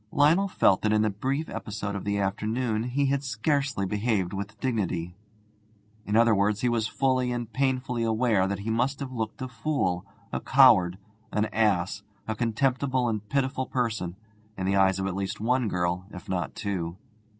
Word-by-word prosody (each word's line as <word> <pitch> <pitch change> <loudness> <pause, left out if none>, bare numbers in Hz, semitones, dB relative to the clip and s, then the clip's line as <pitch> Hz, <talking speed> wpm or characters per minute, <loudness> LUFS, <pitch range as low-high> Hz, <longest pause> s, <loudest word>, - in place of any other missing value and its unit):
Lionel 160 +7 +4
felt 95 - +3
that 110 - +1
in 105 0 +3
the 110 - +1
brief 135 +10 -2
episode 100 -1 -5
of 100 - -5
the 100 0 0
afternoon 110 +3 -1
he 135 +3 0
had 140 0 +1
scarcely 135 -1 0
behaved 105 -2 0
with 100 +2 -5
dignity. 90 -8 -2 0.9
In 105 - 0
other 115 0 +5
words, 105 +1 +1
he 125 - +2
was 115 -2 +1
fully 130 -1 +1
and 120 -2 -4
painfully 130 -2 0
aware 110 -4 +2
that 100 0 -2
he 110 +2 -2
must 125 +5 0
have 135 -2 -5
looked 115 0 -4
a - - -3
fool, 125 - -1 0.3
a - - 0
coward, 105 -10 +5 0.3
an 105 0 +1
ass, 100 -3 +1 0.3
a 110 - -1
contemptible 130 +3 +1
and 105 -2 -3
pitiful 130 -1 0
person, 110 -8 -2 0.4
in 95 - -2
the 100 +1 +2
eyes 95 -1 +4
of 95 - -2
at 95 - -1
least 95 0 -3
one 125 +2 +1
girl, 90 -1 -1
if 90 -4 -10
not 90 -5 -1
of 65 - -23
two. 95 -5 -3
110 Hz, 185 wpm, -27 LUFS, 100-130 Hz, 0.9 s, other